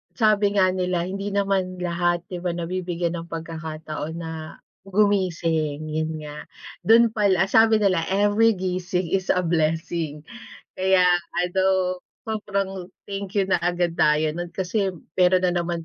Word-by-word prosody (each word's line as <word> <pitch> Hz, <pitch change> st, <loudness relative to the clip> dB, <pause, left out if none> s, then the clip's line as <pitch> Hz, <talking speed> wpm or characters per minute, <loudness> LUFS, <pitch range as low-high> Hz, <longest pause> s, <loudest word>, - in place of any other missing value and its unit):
sabi 210 Hz, -3 st, +3 dB
nga 185 Hz, -1 st, +4 dB
nila 180 Hz, -1 st, -1 dB
hindi 195 Hz, +2 st, -4 dB
naman 195 Hz, -2 st, 0 dB
lahat, 175 Hz, -1 st, 0 dB
'di 180 Hz, -1 st, -7 dB
ba 180 Hz, -, 0 dB
nabibigyan 175 Hz, 0 st, -3 dB
ng 170 Hz, 0 st, -7 dB
pagkakataon 160 Hz, -1 st, -6 dB
na 165 Hz, -1 st, -5 dB, 0.5 s
gumising, 170 Hz, -7 st, 0 dB
yun 155 Hz, +1 st, -2 dB
nga. 150 Hz, 0 st, -8 dB, 0.4 s
Du'n 230 Hz, +1 st, +6 dB
pal 205 Hz, -3 st, +3 dB, 0.2 s
sabi 220 Hz, +2 st, +5 dB
nila 185 Hz, -5 st, +2 dB
every 205 Hz, +3 st, +4 dB
gising 180 Hz, -1 st, -2 dB
is 190 Hz, +2 st, 0 dB
a -, -, +2 dB
blessing. 165 Hz, -2 st, -1 dB, 0.6 s
Kaya 190 Hz, -1 st, +3 dB, 0.4 s
ano, 185 Hz, 0 st, +1 dB, 0.2 s
sobrang 200 Hz, -4 st, -3 dB, 0.2 s
thank 200 Hz, 0 st, -6 dB
you 195 Hz, -, +3 dB
na 190 Hz, -, +2 dB
agad 175 Hz, -1 st, 0 dB
tayo 150 Hz, 0 st, +3 dB
nun, 175 Hz, +2 st, -5 dB
kasi 190 Hz, +3 st, -1 dB, 0.3 s
meron 185 Hz, 0 st, +4 dB
na 180 Hz, -, +3 dB
naman 170 Hz, -1 st, -3 dB
180 Hz, 140 wpm, -23 LUFS, 165-195 Hz, 0.6 s, Du'n